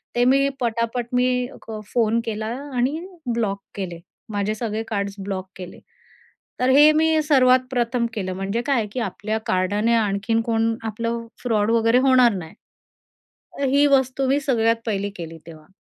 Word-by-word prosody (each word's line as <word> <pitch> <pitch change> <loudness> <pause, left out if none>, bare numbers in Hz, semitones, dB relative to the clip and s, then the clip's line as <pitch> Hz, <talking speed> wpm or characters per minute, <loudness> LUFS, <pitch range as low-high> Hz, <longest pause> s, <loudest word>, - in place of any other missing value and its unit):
ते 245 - +3
मी 275 +2 +4
पटापट 230 0 -1
मी 250 0 +1 0.2
क 220 -1 -5
फोन 230 -1 +2
केला 215 -1 -3 0.3
आणि 260 +6 0 0.3
ब्लॉक 205 -4 -1
केले. 180 -4 -5 0.3
माझे 205 0 -1
सगळे 220 -1 -3
कार्ड्स 200 -2 -3
ब्लॉक 190 -1 -4
केले. 180 -1 -9 0.8
तर 250 - +2
हे 295 +3 +7
मी 315 0 +3
सर्वात 260 -4 +5
प्रथम 240 -1 0
केलं, 185 -4 -3
म्हणजे 195 +5 -2
काय 255 -6 +2
की 255 - -4
आपल्या 215 0 -3
कार्डाने 205 +5 +1
आणखीन 215 +1 +1
कोण 225 0 0
आपलं 230 +2 -3 0.2
फ्रॉड 220 -2 +1
वगैरे 230 +1 +4
होणार 255 -3 +5
नाही. 170 -4 -7 1.2
ही 285 +1 +4
वस्तू 265 -1 +2
मी 275 +2 +2
सगळ्यात 230 -5 +2
पहिली 205 -2 -1
केली 165 -1 -7
तेव्हा. 155 -2 -13
230 Hz, 150 wpm, -22 LUFS, 205-250 Hz, 1.2 s, हे